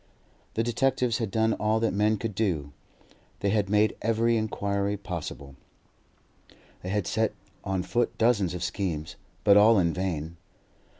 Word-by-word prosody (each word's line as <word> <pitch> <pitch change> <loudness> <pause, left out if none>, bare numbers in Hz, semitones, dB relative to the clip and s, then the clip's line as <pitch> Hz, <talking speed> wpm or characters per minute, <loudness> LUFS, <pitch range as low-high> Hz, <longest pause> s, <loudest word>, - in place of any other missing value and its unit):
The 115 - +1
detectives 125 0 +1
had 115 -4 -2
done 110 +2 +1
all 110 +1 +1
that 115 -2 0
men 105 +2 +2
could 110 +1 -4
do; 85 -9 -1 0.7
they 100 - +1
had 105 -2 +1
made 105 +1 +3
every 115 +1 +2
inquiry 100 -2 -1
possible, 85 -7 -7 1.3
they 90 - -6
had 100 -1 0
set 110 0 0 0.3
on 95 -1 -1
foot 120 +4 -1
dozens 105 -7 +2
of 90 - -4
schemes; 90 -3 -3 0.3
but 100 -1 +6
all 110 +2 +6
in 85 -3 +2
vain. 85 -3 -3
105 Hz, 145 wpm, -27 LUFS, 90-110 Hz, 1.3 s, but